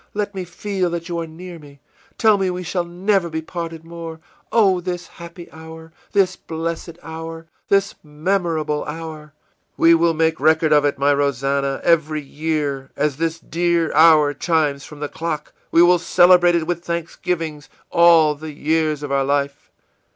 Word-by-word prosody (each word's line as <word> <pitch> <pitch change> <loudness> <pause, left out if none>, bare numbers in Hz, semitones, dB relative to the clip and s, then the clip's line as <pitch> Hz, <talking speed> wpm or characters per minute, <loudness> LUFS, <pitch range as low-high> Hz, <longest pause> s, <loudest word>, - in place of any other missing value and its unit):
Let 205 0 -2
me 190 -2 -5
feel 185 +1 -2
that 170 0 -5
you 170 -1 -2
are 165 - -4
near 170 +2 -10
me! 140 -2 -16 0.4
Tell 215 -3 +4
me 190 -1 +1
we 180 0 -4
shall 175 0 -2
never 180 +1 0
be 160 0 -4
parted 165 -1 -6
more! 165 -1 -8 0.3
Oh, 195 -6 +3
this 175 0 -4
happy 170 0 -11
hour, 160 0 -12 0.2
this 190 -2 +2
blessed 165 0 -5
hour, 165 0 -8 0.2
this 200 0 +2
memorable 155 -1 -1
hour!î 155 -1 -8 0.5
ìWe 165 0 +6
will 165 0 +3
make 160 0 +1
record 155 +1 +3
of 145 -1 +4
it, 145 - 0
my 140 +1 +3
Rosannah; 140 0 0
every 155 -2 +2
year, 145 -2 -3
as 150 -3 -1
this 165 0 -1
dear 170 0 0
hour 155 -2 +6
chimes 150 -2 0
from 150 -1 -12
the 150 - -2
clock, 160 -1 -5 0.2
we 170 - +5
will 175 0 +5
celebrate 175 0 +5
it 165 -2 0
with 175 0 -3
thanksgivings, 165 -2 -4 0.2
all 170 -3 +5
the 155 +1 -9
years 155 0 0
of 145 - -5
our 135 0 +2
life. 140 0 -2
165 Hz, 165 wpm, -20 LUFS, 150-175 Hz, 0.5 s, ìWe